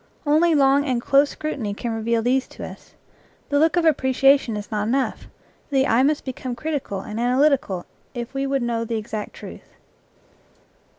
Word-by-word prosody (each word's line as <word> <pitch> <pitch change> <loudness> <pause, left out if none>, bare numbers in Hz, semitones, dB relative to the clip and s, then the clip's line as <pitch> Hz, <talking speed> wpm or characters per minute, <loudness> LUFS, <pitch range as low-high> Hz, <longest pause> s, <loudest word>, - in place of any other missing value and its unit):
Only 315 +3 +4
long 275 0 +4
and 255 -4 0
close 275 +4 +3
scrutiny 250 -10 -4
can 235 +2 -4
reveal 225 0 0
these 260 +2 +1
to - - -9
us. - - -12 0.5
The 285 - +2
look 320 +3 +3
of 340 - +2
appreciation 270 -5 +3
is 205 +1 -8
not 210 -1 -1
enough; 265 +3 -1 0.4
the 270 -2 +2
eye 235 -2 +3
must 295 +2 +1
become 255 -1 -5
critical 275 -9 -3
and 210 +3 -6
analytical 250 -6 +1 0.3
if 240 +1 -5
we 275 0 -1
would 270 -2 0
know 235 -1 -1
the 230 0 -2
exact 215 0 -5
truth. - - -11
260 Hz, 170 wpm, -22 LUFS, 230-285 Hz, 0.5 s, Only